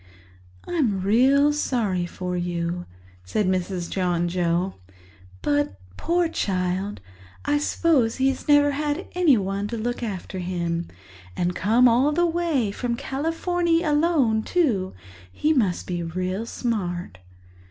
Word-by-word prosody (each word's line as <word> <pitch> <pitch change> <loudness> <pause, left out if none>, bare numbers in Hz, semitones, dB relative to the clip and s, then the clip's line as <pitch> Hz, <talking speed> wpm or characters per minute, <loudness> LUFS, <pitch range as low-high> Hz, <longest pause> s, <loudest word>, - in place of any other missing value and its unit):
"I'm 235 - 0
really 270 +8 +4
sorry 215 -11 0
for 180 +1 -4
you," 175 0 -2 0.4
said 95 - -1
Mrs. 185 -1 -1
John 175 -2 0
Joe. 175 +1 0 0.7
"But, 145 -10 0 0.2
poor 345 - +1
child, 190 - -2 0.4
I 290 0 +2
suppose 290 -6 +2
he's 265 0 0
never 290 -1 +5
had 295 +5 -2
anyone 205 - +2
to 230 +2 -4
look 240 +3 -3
after 195 -4 -5
him. 170 -2 -2 0.5
And 175 0 0
come 230 +6 +4
all 250 +5 +4
the 345 +3 +2
way 325 -10 0
from 235 +3 -2
Californy 330 +5 0
alone, 295 -8 +2
too—he 185 - -1
must 205 - +1
be 175 -1 -3
real 185 +6 -3
smart." 180 - -3
215 Hz, 120 wpm, -24 LUFS, 180-290 Hz, 0.7 s, never